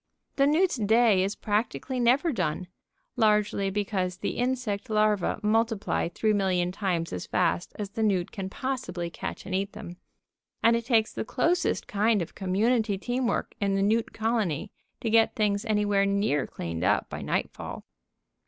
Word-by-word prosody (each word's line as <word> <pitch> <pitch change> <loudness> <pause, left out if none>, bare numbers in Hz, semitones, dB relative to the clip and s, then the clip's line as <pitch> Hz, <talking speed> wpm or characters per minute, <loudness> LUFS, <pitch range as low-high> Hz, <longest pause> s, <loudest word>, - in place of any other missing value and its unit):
The 275 0 +4
newt's 325 +1 +2
day 220 -2 +4
is 195 +2 -2
practically 220 - -2
never 255 +7 +3
done, 185 - -2 0.5
largely 210 -3 +2
because 195 -2 -2
the - - -3
insect 245 -4 -1
larvæ 215 -1 +1
multiply 225 -4 +1
three 215 +5 0
million 185 -3 +1
times 180 -4 -2
as 90 - -5
fast 175 -1 0
as 205 -2 -5
the 225 - -4
newt 195 -5 +1
can 190 -2 -5
possibly 190 -9 -4
catch - - -6
and 190 - -5
eat 195 +2 -1
them. 190 -5 -9 0.7
And 230 +1 +5
it 235 0 -3
takes 225 -4 +2
the - - -3
closest 330 +11 0
kind 210 -1 +2
of 160 - -11
community 210 +3 +1
team 245 +5 -1
work - - -1
in 200 -1 +1
the 195 - +1
newt 220 +3 +1
colony 215 -6 -1 0.3
to 230 - -1
get 225 0 +4
things 210 0 0
anywhere 205 -2 +2
near 200 -8 +1
cleaned 85 0 -5
up 100 +3 +2
by - - -6
nightfall. - - -3
210 Hz, 160 wpm, -27 LUFS, 190-230 Hz, 0.7 s, And